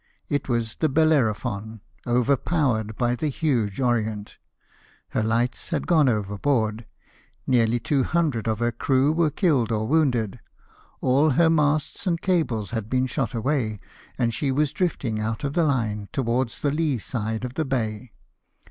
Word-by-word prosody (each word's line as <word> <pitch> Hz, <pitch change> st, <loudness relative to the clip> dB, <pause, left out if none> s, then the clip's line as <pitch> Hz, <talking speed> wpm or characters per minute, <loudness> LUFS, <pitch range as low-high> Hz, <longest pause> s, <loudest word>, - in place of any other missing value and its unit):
It 145 Hz, -1 st, -1 dB
was 115 Hz, -2 st, -1 dB
the 155 Hz, -, +1 dB
Belleviyphon, 115 Hz, -8 st, +1 dB, 0.3 s
overpowered 125 Hz, -2 st, +1 dB
by 120 Hz, -1 st, +1 dB
the 150 Hz, -, -2 dB
huge 125 Hz, -, -1 dB
Orient; 110 Hz, -5 st, -1 dB, 0.7 s
her -, -, -1 dB
lights 115 Hz, +2 st, 0 dB
had 160 Hz, -5 st, -1 dB
gone 155 Hz, -6 st, +4 dB
overboard, 110 Hz, +1 st, -1 dB, 0.6 s
nearly 120 Hz, -2 st, +2 dB
200 140 Hz, -1 st, 0 dB
of 110 Hz, -1 st, 0 dB
her 120 Hz, +1 st, 0 dB
crew 130 Hz, +4 st, +2 dB
were 160 Hz, 0 st, +2 dB
killed 140 Hz, -, +1 dB
or 110 Hz, 0 st, -1 dB
wounded, 125 Hz, -8 st, +1 dB, 0.6 s
all 140 Hz, +5 st, +3 dB
her 160 Hz, +4 st, +4 dB
masts 155 Hz, +3 st, 0 dB
and 170 Hz, -2 st, +1 dB
cables 155 Hz, -, 0 dB
had 110 Hz, -2 st, -3 dB
been 130 Hz, +1 st, +1 dB
shot 130 Hz, -2 st, -2 dB
away, 115 Hz, -3 st, -1 dB, 0.4 s
and 115 Hz, -1 st, +1 dB
she 135 Hz, +4 st, -1 dB
was 145 Hz, +1 st, +1 dB
drifting 135 Hz, -11 st, -1 dB
out 110 Hz, +5 st, -3 dB
of 140 Hz, 0 st, -2 dB
the 170 Hz, -, +2 dB
line, 110 Hz, -8 st, -1 dB
towards 125 Hz, -2 st, -1 dB
the 145 Hz, -, +2 dB
lee 150 Hz, -3 st, 0 dB
side 110 Hz, +1 st, -3 dB
of 125 Hz, -, -6 dB
the 160 Hz, -, -1 dB
bay. 115 Hz, -3 st, -3 dB
125 Hz, 150 wpm, -24 LUFS, 110-145 Hz, 0.7 s, gone